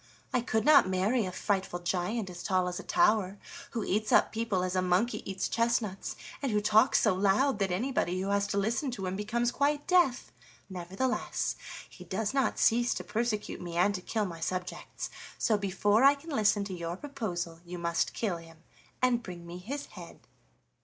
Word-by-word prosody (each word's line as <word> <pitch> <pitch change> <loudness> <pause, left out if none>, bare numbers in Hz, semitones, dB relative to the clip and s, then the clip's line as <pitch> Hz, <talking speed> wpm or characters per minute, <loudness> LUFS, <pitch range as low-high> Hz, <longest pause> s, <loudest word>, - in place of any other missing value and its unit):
I 250 - +2
could 220 -2 0
not 290 -10 +7
marry 195 +4 +1
a - - -4
frightful 190 -1 -1
giant 185 +5 -2
as 175 0 -8
tall 185 -1 +1
as 180 +1 -3
a - - -7
tower, 220 - +2 0.3
who 230 - -3
eats 215 +2 -1
up - - +5
people 220 -5 -1
as 185 0 -2
a 185 - +2
monkey 185 +6 +1
eats 190 -1 -2
chestnuts, 230 -4 -1 0.3
and 275 -4 -1
who 210 - +2
talks 215 +4 +4
so 215 - +4
loud 205 +6 +2
that 195 -1 +1
anybody 185 -2 0
who 195 +1 -2
has 200 0 +1
to 200 - -2
listen 225 +7 0
to 215 -6 -4
him 185 +1 -2
becomes 235 +4 0
quite 290 +2 0
deaf. 350 -9 +2 0.4
Nevertheless, 190 +8 -2 0.3
he 180 - -13
does 200 +5 -2
not 270 -1 +1
cease 240 +1 +3
to - - -4
persecute 220 -2 -2
me 170 -1 -5
and 190 +4 +4
to 185 - -4
kill 215 +3 -1
my 170 -3 -6
subjects. 180 +2 -4 0.3
So 220 - +2
before 205 +3 +2
I 280 +1 +7
can 315 +4 -11
listen 210 -5 +2
to 200 -1 -5
your 170 0 -4
proposal 180 - -4
you 175 0 -7
must 170 -1 -1
kill 200 -7 -1
him 165 -1 -15 0.4
and 245 -2 +3
bring 175 -5 -9
me 175 +1 -8
his 275 +10 -5
head." - - -12
205 Hz, 195 wpm, -30 LUFS, 180-235 Hz, 0.4 s, not